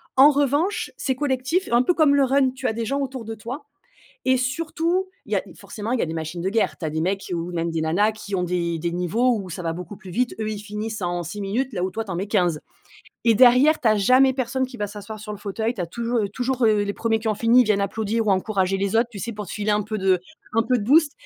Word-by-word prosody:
En 270 +3 +8
revanche 290 +7 0
c'est 265 - -1
collectif, 275 +6 0
un 240 - +6
peu 350 - +2
comme 300 -4 +4
le 280 - +4
run. 265 0 +3
Tu 260 0 -4
as 220 - 0
des 230 +1 -3
gens 275 +5 -1
autour 260 -3 -4
de 225 +1 -5
toi 255 +7 -7 0.6
et 260 0 +4
surtout 330 +8 -1 0.2
il - - -11
y - - +4
a - - 0
forcément 215 +2 -6
il 255 - +1
y - - 0
a - - +1
des 160 - -4
machines 160 +1 -4
de 190 - 0
guerre. 225 +1 +1
Tu 165 - -6
as 155 - -1
des 160 - -2
mecs 190 +2 -2
ou 170 +1 -3
même 170 0 -1
des 165 -1 -2
nanas 185 +8 +2
qui 210 -2 -7
ont 180 - +1
des 170 -2 -1
des 170 +1 -2
niveaux 220 +9 +1
où 190 - -8
ça 180 +1 -6
va 165 - -1
beaucoup 180 +3 -8
plus 190 -2 -12
vite, 245 +7 0
eux 215 - -1
ils 210 -1 -4
finissent 215 +1 -5
en 175 -1 -2
6 175 +5 -6
minutes 240 +7 -2
là 180 -4 -3
où 185 - 0
toi 225 +3 -4
tu 205 - -9
en 175 - -2
mets 190 +3 -2
15 180 -7 +1 0.6
et 230 -1 +5
derrière 255 +6 +6
tu - - -2
as 215 -1 +5
jamais 255 +6 +5
personne 260 0 -1
qui 255 -1 -11
va 205 -3 -3
s'asseoir 210 +1 -8
sur 215 0 -8
le 205 - -7
fauteuil. 220 +3 -2
Tu 210 - -7
as 175 - -1
toujou 235 +6 -2
heu, 205 - 0
toujours, 250 +4 -1
heu, 210 -1 +3
les 200 0 -2
premiers 225 +1 0
qui 225 - -2
ont 215 - +1
fini, 235 +3 +5
ils - - +5
viennent 210 -2 +2
applaudir 215 +2 -1
ou - - +3
encourager 190 0 0
les 200 +2 0
autres, 230 +1 +3
tu 200 - -7
sais 235 +4 -4
pour 210 -1 -6
te - - -8
filer 210 0 -1
un 210 0 +2
peu 215 +1 -4
de 190 -2 +2 0.3
un 225 - +4
peu 250 +2 +1
de - - -3
boost. 295 +4 +4
215 Hz, 290 wpm, -23 LUFS, 195-255 Hz, 0.6 s, En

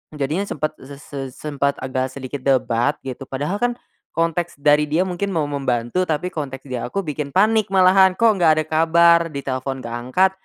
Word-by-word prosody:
Jadinya 150 +6 -1
sempat 155 0 -3
ze 140 +1 -11
se 145 -1 -8
sempat 140 0 -2
agak 130 0 -2
sedikit 135 0 -7
debat 125 -3 +1
gitu 130 +1 -6
padahal 145 +8 -3
kan, 245 0 0 0.4
konteks 165 -1 -1
dari 150 +1 +4
dia 160 +5 +2
mungkin 190 +2 -3
mau 160 -5 0
membantu 135 +2 -1
tapi 160 +3 -1
konteks 135 -6 -5
di 130 - -4
aku 160 +12 -3
bikin 150 -1 -4
panik 215 +4 +3
malahan 190 0 +5
kok 230 -1 +6
gak 165 -3 +5
ada - - +1
kabar 170 +2 +5
ditelepon 135 -1 -4
gak 115 0 -5
angkat, 130 +11 +2
150 Hz, 180 wpm, -21 LUFS, 135-175 Hz, 0.4 s, kok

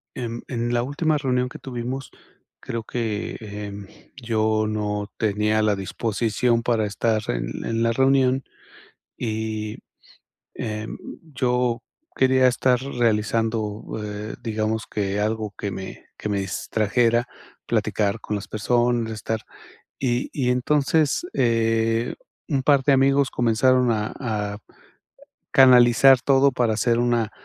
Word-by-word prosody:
en 120 -2 -5
en 120 -1 -2
la 120 - +1
última 150 +4 0
reunión 125 -3 0
que 155 +4 -10
tuvimos, 130 0 -5 0.5
creo 115 -1 -5
que, 110 -2 -3
em, 100 -1 -7 0.3
yo 110 -2 +1
no 105 -1 -2
tenía 105 0 +1
la 105 -1 +2
disposición 115 +4 0
para 115 -3 +1
estar 110 +1 0
en - - -3
en 115 0 0
la 115 - +2
reunión, 130 +1 +3 0.7
y, 110 -2 -3 0.8
em, 110 0 -5 0.4
yo 125 -2 +1 0.4
quería 130 0 +4
estar 125 0 +2
realizando, 115 -3 0 0.2
eh, 105 +1 -5
digamos, 110 0 -2
que 100 -1 -1
algo 110 -1 -2
que 100 - -3
me 95 - -8
que - - -5
me 100 -1 0
distrajera, 115 +5 +1 0.4
platicar 105 +1 0
con 105 - -3
las 100 - -7
personas, 120 +1 +1
estar 110 0 -3 0.6
y 125 -1 0
y 130 -4 0
entonces, 145 - +2
eh, 115 -1 +1 0.3
un 140 -5 0
par 140 -1 +4
de 140 - +4
amigos 135 0 +3
comenzaron 125 +1 +3
a 105 -1 -1
a 105 -4 -3 1.0
canalizar 125 0 +7
todo 135 +1 +4
para 120 -3 +1
hacer 115 +2 +1
una 120 -2 +1
115 Hz, 125 wpm, -23 LUFS, 110-125 Hz, 1.0 s, canalizar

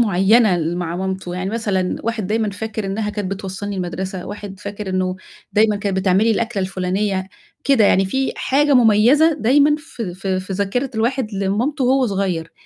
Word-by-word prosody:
معينة 210 0 +4
اللي 170 +1 -2
مع 175 -1 -3
مامته، 190 -1 -4
يعني 185 +1 -3
مثلًا 200 -5 -1
واحد 225 -3 -2
دايمًا 215 +1 0
فاكر 220 0 -5
إنها 210 +2 -2
كانت 205 -3 -4
بتوصلني 195 +1 -5
المدرسة، 185 +1 -4
واحد 205 -2 -8
فاكر 205 0 -6
إنه 185 0 -1 0.4
دايمًا 215 0 +3
كانت 200 -2 -2
بتعمل 190 +2 +3
لي 230 - +3
الأكلة 220 -2 -1
الفلانية، 190 +1 -1 0.4
كده 265 -6 +4
يعني 195 -1 +4
في 265 +7 -1
حاجة 285 +1 +2
مميزة 250 +8 +5
دايمًا 285 +5 +4
في 235 - -7
في 190 0 -2
في 185 +1 -7
ذاكرة 205 +7 -1
الواحد 230 0 -1
لمامته 220 +9 -1
وهو 260 0 +3
صغير، 185 -5 -2
205 Hz, 170 wpm, -20 LUFS, 190-230 Hz, 0.4 s, مميزة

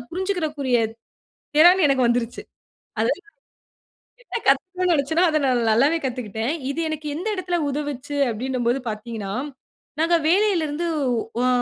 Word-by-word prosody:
புரிஞ்சிக்கக்கூடிய 315 -9 -1 0.8
திறன் 355 +4 +7
எனக்கு 260 -3 +3
வந்துருச்சி. 240 0 -1 0.6
அதாவது - - +1 1.0
என்ன - - -4
கத்துக்கணும்னு 365 +6 +2
நினைச்சேனோ, 320 +4 +2
அத 310 -1 +2
நான் 250 -2 +2
நல்லாவே 280 +9 +3
கத்துக்கிட்டேன். 235 0 -3 0.2
இது 300 - -5
எனக்கு 310 -1 -4
எந்த 355 +7 -4
எடத்தில 355 -2 -1
உதவுச்சி 290 -1 -4 0.2
அப்டின்னும் 250 +2 -2
போது 260 +2 0
பார்த்தீங்கன்னா, 215 -2 -5 0.7
நாங்க 340 +1 +4
வேலைல 380 0 +3
இருந்து, 310 +4 -3 0.5
உ - - +1
அ, - - +3
290 Hz, 130 wpm, -23 LUFS, 245-345 Hz, 1.0 s, திறன்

